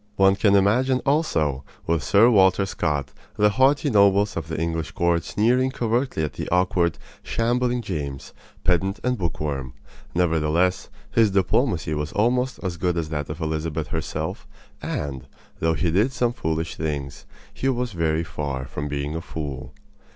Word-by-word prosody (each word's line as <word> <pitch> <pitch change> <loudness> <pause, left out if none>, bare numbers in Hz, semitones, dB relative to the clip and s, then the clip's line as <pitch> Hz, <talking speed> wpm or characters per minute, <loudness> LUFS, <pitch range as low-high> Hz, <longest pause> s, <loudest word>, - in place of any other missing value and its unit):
One 95 0 +5
can 100 0 +3
imagine 125 +7 +3
also, 80 - +1 0.2
with 80 -2 +1
Sir 100 +8 +5
Walter 95 -2 +4
Scott, 75 -7 -2 0.3
the 105 0 +5
haughty 140 +5 +3
nobles 100 0 +4
of 80 -2 -4
the 80 -1 -4
English 80 -3 -2
court 85 -1 +1
sneering 125 +7 +2
covertly 120 - -1
at 75 -3 -2
the - - -5
awkward, 90 -1 +2 0.2
shambling 120 +1 0
James, 70 -9 -5 0.3
pedant 95 +3 +1
and 125 0 +1
bookworm. 75 - -3 0.4
Nevertheless, 85 +1 +1 0.2
his 115 -2 +4
diplomacy 95 - +1
was 75 0 -3
almost 125 +4 +1
as 90 -3 -3
good 90 0 0
as 80 -2 -2
that 75 -2 -3
of 75 +2 -6
Elizabeth 80 0 -2
herself; - - -4 0.3
and, 70 -3 -4 0.3
though 80 0 +1
he 85 0 0
did 105 +10 +2
some 120 -2 0
foolish 80 -4 -3
things, 70 -3 -4 0.3
he 135 - -1
was 125 -2 -1
very 80 -3 0
far 70 -5 -4
from 70 +2 -5
being 70 +1 -3
a 80 - -3
fool. 70 -6 -6
85 Hz, 155 wpm, -24 LUFS, 75-110 Hz, 0.4 s, One